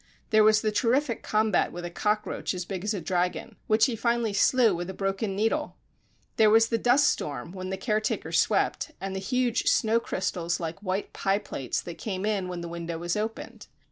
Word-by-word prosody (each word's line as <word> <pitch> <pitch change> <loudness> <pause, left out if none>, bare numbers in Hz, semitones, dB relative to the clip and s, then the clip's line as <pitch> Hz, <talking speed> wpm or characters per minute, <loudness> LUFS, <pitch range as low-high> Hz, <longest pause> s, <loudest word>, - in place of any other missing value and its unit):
There 215 -1 +6
was 215 0 +5
the 215 - 0
terrific 240 +3 +1
combat 215 -2 +1
with 175 0 -6
a 175 - -5
cockroach 210 +1 -1
as 180 -1 -4
big 190 -1 -5
as 210 +1 -1
a - - -2
dragon, 180 +5 -2
which 220 +1 +4
he 245 - -1
finally 235 -1 0
slew 235 +1 +4
with 175 +1 -4
a 190 - -6
broken 195 +1 -2
needle! 225 +9 0 0.6
There 220 -1 +6
was 225 +1 +5
the 230 - 0
dust 260 +5 +4
storm, 145 +1 -2
when 185 0 -6
the 190 - -3
care 215 +2 0
taker - - -2
swept, 315 - +1
and 195 0 -4
the - - -2
huge 250 +4 0
snow 225 0 +3
crystals 180 -5 -2
like 165 +2 -5
white 190 0 -3
pie 195 0 +1
plates, 135 - -4
that 170 - -9
came 195 -2 -3
in 205 -4 0
when 180 -1 -5
the 170 - -5
window 170 0 -5
was 175 +1 -2
opened. 220 +1 -5
205 Hz, 205 wpm, -27 LUFS, 180-225 Hz, 0.6 s, There